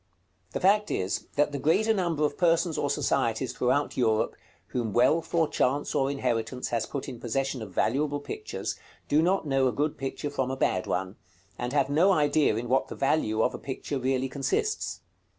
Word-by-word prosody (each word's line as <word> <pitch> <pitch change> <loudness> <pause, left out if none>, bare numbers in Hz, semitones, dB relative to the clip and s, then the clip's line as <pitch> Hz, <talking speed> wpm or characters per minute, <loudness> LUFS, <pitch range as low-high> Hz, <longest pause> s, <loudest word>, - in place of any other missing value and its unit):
The - - -1
fact 210 +2 +3
is, 95 +2 -2
that 145 0 +2
the 140 - -3
greater 195 +10 +3
number 170 -6 0
of 145 - -1
persons 170 -1 +2
or 145 - -1
societies 130 -4 0
throughout 130 +4 0
Europe, 110 -3 +1 0.3
whom 115 -5 -2
wealth, 155 +7 +3
or 165 -2 +4
chance, 140 +1 0
or 135 0 +1
inheritance 125 -2 -2
has 115 -2 -1
put 140 - -5
in 120 - -7
possession 130 +2 -2
of 110 - -6
valuable 145 - 0
pictures, 425 - -5 0.3
do 150 +2 +3
not 185 +1 +1
know 135 -2 +2
a - - +1
good 145 +3 -1
picture 135 +2 -4
from 135 -2 -1
a 130 - -3
bad 95 -7 0
one, 95 +2 -2 0.4
and 125 +4 -4
have 140 -1 +2
no 170 +7 +4
idea 150 -6 +3
in 120 +2 -3
what 130 +2 +2
the - - -7
value 125 -6 +1
of - - +1
a - - -6
picture 140 +1 -4
really 130 0 0
consists. 420 - -2
135 Hz, 190 wpm, -27 LUFS, 125-155 Hz, 0.4 s, or